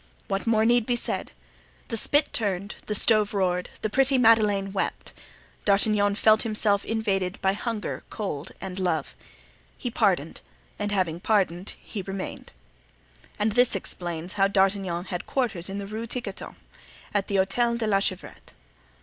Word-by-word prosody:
What 195 +2 -2
more 220 -1 +3
need 240 -1 +3
be 245 - +2
said? 240 - -2 0.6
The - - -1
spit 290 +6 +2
turned, 200 -2 -1
the 210 - -1
stove 215 0 +3
roared, 180 -2 0
the 215 - +1
pretty 270 +2 +4
Madeleine 210 -5 +4
wept; 195 - -3 0.5
D'Artagnan 205 0 +3
felt 215 0 +5
himself 215 -3 +1
invaded 195 -4 -1
by 190 0 +2
hunger, 220 +1 -4
cold 185 -6 -4
and 190 0 -6
love. 165 -6 -1 0.6
He - - -4
pardoned, - - +1 0.4
and 205 0 -1
having 180 -5 0
pardoned 190 -3 0
he 210 - -6
remained. 195 0 -6 0.9
And 210 +1 +1
this 245 0 +4
explains 175 -2 -5
how 195 -1 +3
D'Artagnan 190 -3 +1
had 180 -2 -5
quarters 220 -10 -1
in 195 - -4
the 200 - -4
Rue 220 +3 -5
Tiquetonne, 225 -5 -5 0.6
at 200 -2 0
the 200 - -2
Hotel 235 +5 +2
de 230 - -1
la 200 -2 +3
Chevrette. 185 -2 -4
200 Hz, 150 wpm, -26 LUFS, 190-220 Hz, 0.9 s, felt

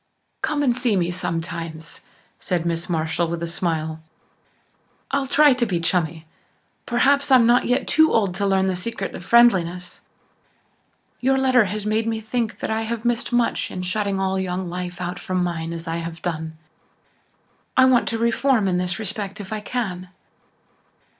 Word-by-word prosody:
"Come 290 -1 0
and 245 -4 +2
see 245 -4 +1
me 175 -2 +1
sometimes," 165 -3 -5 0.4
said 175 -2 -2
Miss 170 +1 -2
Marshall 160 0 0
with 170 0 -4
a - - -2
smile. 160 -2 -2 1.1
"I'll 275 0 0
try 290 +1 +5
to 250 -1 0
be 180 -4 -1
'chummy' 165 -1 -1 0.6
perhaps 275 +4 +2
I'm 255 -3 +6
not 240 +1 +4
yet 250 +2 0
too 315 0 +4
old 200 -5 +2
to 200 +2 -1
learn 190 -1 +2
the 190 -1 0
secret 195 +1 -4
of - - -8
friendliness. 180 -7 +3 1.2
Your 265 +1 +2
letter 255 -4 +4
has 205 +2 -3
made 220 +1 0
me 225 -1 -1
think 220 +1 -3
that - - -2
I 220 0 0
have 225 +1 -4
missed 240 0 0
much 240 -1 +1
in 185 - -5
shutting 195 +1 -1
all 190 0 0
young 185 0 -3
life 180 0 -5
out 180 0 -4
from 185 -1 -1
mine 165 -2 -3
as 165 0 -6
I 165 0 -2
have 165 0 -6
done. 160 -2 -4 1.2
I 260 - +7
want 255 -2 +4
to 230 - -1
reform 235 -1 +2
in 180 -1 +1
this 180 -1 -1
respect 205 -2 -4
if 205 +1 -6
I 215 - -2
can." 200 -5 -4
190 Hz, 175 wpm, -22 LUFS, 175-235 Hz, 1.2 s, I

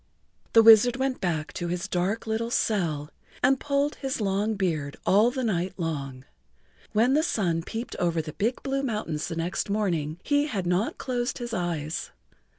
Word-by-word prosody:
The 225 - +8
wizard 225 +2 +8
went 265 0 -1
back 160 -4 -2
to 175 -2 -3
his 175 +1 -2
dark 190 +5 -1
little 225 +1 -1
cell 165 -11 0 0.3
and 265 +1 +4
pulled 285 +1 0
his 270 -3 -3
long 205 +1 0
beard 160 -8 -2
all 210 +5 +5
the 260 +1 -3
night 185 -4 -1
long. 140 -6 -4 0.7
When 235 +4 +3
the 300 - +4
sun 180 - 0
peeped 225 +7 -6
over 170 -2 +1
the 155 -1 -4
big 230 +5 -1
blue 275 0 -1
mountains 210 - -2
the 165 - -4
next 170 +4 -2
morning 175 -7 -1
he 290 0 +2
had 200 -10 -3
not 180 +5 0
closed 245 0 -2
his 240 -2 -5
eyes. 170 -4 -2
200 Hz, 170 wpm, -26 LUFS, 170-240 Hz, 0.7 s, The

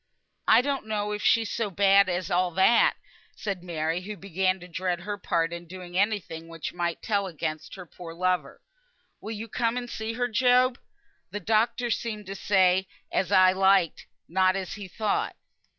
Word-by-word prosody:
"I 225 - +7
don't 275 -4 -2
know 210 -1 -2
if 210 0 -3
she's 225 -2 +3
so 230 -3 -1
bad 200 0 +4
as 180 +1 -2
all 180 +1 +2
that," 210 +5 +5 0.4
said 195 -4 -4
Mary, 165 -1 -2
who 205 +2 -7
began 190 0 0
to 180 - -11
dread 180 0 -2
her 205 +3 -4
part 170 -4 -1
in 170 0 -7
doing 180 0 -9
any 205 +2 +2
thing 165 -3 -10
which 165 -1 -6
might 170 -1 -3
tell 200 -3 0
against 155 -2 -5
her 185 - -9
poor 170 0 -10
lover. 185 +1 -1 0.6
"Will 220 - -5
you 220 +1 -6
come 230 +1 -1
and 245 -1 -4
see 220 -1 -4
her, 245 +1 0
Job? 250 +2 +3 0.5
The 205 - -5
doctor 225 +4 +1
seemed 215 -2 -3
to 195 +1 -6
say 190 0 +3 0.2
as 190 0 0
I 185 -2 +6
liked, 190 -3 +2 0.2
not 185 +2 +2
as 190 -2 -4
he 205 -2 -7
thought." 210 +3 -1
190 Hz, 180 wpm, -27 LUFS, 180-215 Hz, 0.6 s, I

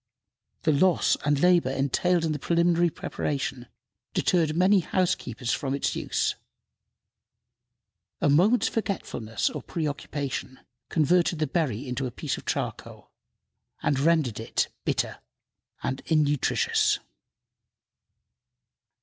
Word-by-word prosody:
The 155 - +3
loss 175 +4 +3
and 145 -1 +2
labor 175 -4 +4
entailed 150 +6 +1
in 160 - 0
the 150 - -2
preliminary 170 +2 +2
preparation 135 -4 -4 0.5
deterred 160 -4 +2
many 190 +3 +5
housekeepers 165 - -1
from 135 -1 -1
its 140 - -1
use. - - 0 1.9
A - - +2
moment's 185 +12 +4
forgetfulness 115 - -2
or - - -5
preoccupation 145 -4 -4 0.3
converted 170 +2 +2
the 155 - +1
berry 135 -5 -1
into 125 +1 -2
a - - -6
piece - - -3
of - - -11
charcoal, - - -4 0.7
and 140 -2 +1
rendered 150 -7 +2
it 115 - -1 0.2
bitter - - -1 0.6
and 130 - -2
innutritious. 150 -3 +2
150 Hz, 105 wpm, -26 LUFS, 135-175 Hz, 1.9 s, many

